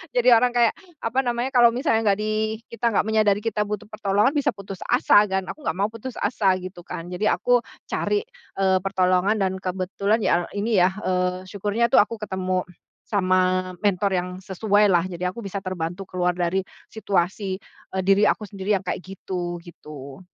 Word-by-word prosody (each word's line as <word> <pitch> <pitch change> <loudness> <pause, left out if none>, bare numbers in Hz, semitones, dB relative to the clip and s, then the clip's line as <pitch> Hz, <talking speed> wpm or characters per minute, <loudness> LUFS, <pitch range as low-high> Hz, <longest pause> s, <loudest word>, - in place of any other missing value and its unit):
Jadi 245 0 +2
orang 245 +2 +3
kayak 240 -2 +3 0.2
apa 255 +4 0
namanya, 240 0 -1
kalau 240 -1 +7
misalnya 240 -2 +1
nggak 200 -2 +2
di 215 +1 -1
kita 235 0 -1
nggak 210 - +1
menyadari 215 -2 +3
kita 215 -1 -1
butuh 210 0 -5
pertolongan 210 +5 +1
bisa 290 - +2
putus 195 -1 -9
asa 205 - +5
kan. 190 -2 -2
Aku 305 - -8
nggak - - 0
mau 195 +4 0
putus 230 +3 -8
asa 200 -5 +2
gitu 180 -1 -9
kan, 165 0 -7
jadi 180 +4 0
aku 245 -1 +3 0.2
cari, 415 - 0 0.4
eee, 190 -1 +3
pertolongan 190 +2 +2
dan 190 -1 0
kebetulan 190 +3 -1
ya 175 -4 +2
ini 215 +2 -1
ya, 185 - +4
eee, 185 -2 -1
syukurnya 205 +4 0
tuh 230 - +6
aku 225 +1 -8
ketemu 185 -3 -2 0.4
sama 185 -2 +1
mentor 200 0 +1
yang 180 - -4
sesuailah. 195 -2 +2
Jadi 180 -1 -7
aku 180 +5 -2
bisa 200 -3 -5
terbantu 180 0 -4
keluar 180 -1 -1
dari 175 +1 0 0.3
situasi, 190 -2 -1 0.4
eee, 190 - +1
diri 195 +2 +4
aku - - +1
sendiri 200 0 -1
yang 195 - -3
kayak 180 - -3
gitu, 180 -2 -5
gitu. 150 -2 -11
195 Hz, 175 wpm, -23 LUFS, 185-215 Hz, 0.4 s, kalau